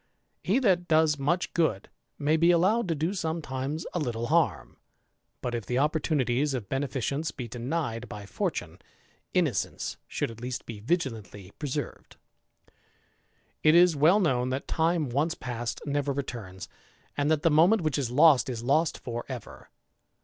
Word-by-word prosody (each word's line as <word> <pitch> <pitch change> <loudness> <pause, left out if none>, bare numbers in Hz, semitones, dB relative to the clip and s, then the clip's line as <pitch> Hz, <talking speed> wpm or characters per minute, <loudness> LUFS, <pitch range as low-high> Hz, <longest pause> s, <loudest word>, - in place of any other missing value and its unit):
He 195 +6 +2
that 185 -9 +2
does 155 -2 +3
much 170 +6 0
good, 135 - 0 0.3
may 150 +2 +2
be 165 +2 +4
allowed 190 +6 +3
to 165 - 0
o 160 +5 -1
soxnetimes 160 -4 -3
a 175 - -1
little 120 -6 -2
harm. - - +1 0.6
But 125 - -3
if 115 -3 -4
the 125 - -1
opportunities 145 -2 +1
of 115 -6 -5
•eneficence 140 +3 -2
be 125 -4 -4
denied 120 0 -3
by 105 -1 -8
fortune, - - -3 0.6
innocence - - 0
should - - -2
at 115 0 -12
least 125 0 -4
»c 115 -3 -7
vigilantly 110 - -3
preserved. 145 0 -5 1.5
It 155 +1 +5
is 175 -1 +6
well 160 +8 +5
known, 130 -9 +1
that 130 +2 -3
time 165 -2 +1
once 145 +7 0
past 120 -1 -5
never 145 -1 -1
returns; 115 -9 -6 0.5
and 145 +1 0
hat 155 -1 +1
the 165 - +4
moment 170 +7 +5
which 155 -2 0
is 130 -4 -1
lost 145 +1 +5
is 120 -2 -4
lost 155 +6 +2
for 120 -1 -5
ever. 125 -4 -8
145 Hz, 155 wpm, -28 LUFS, 125-160 Hz, 1.5 s, is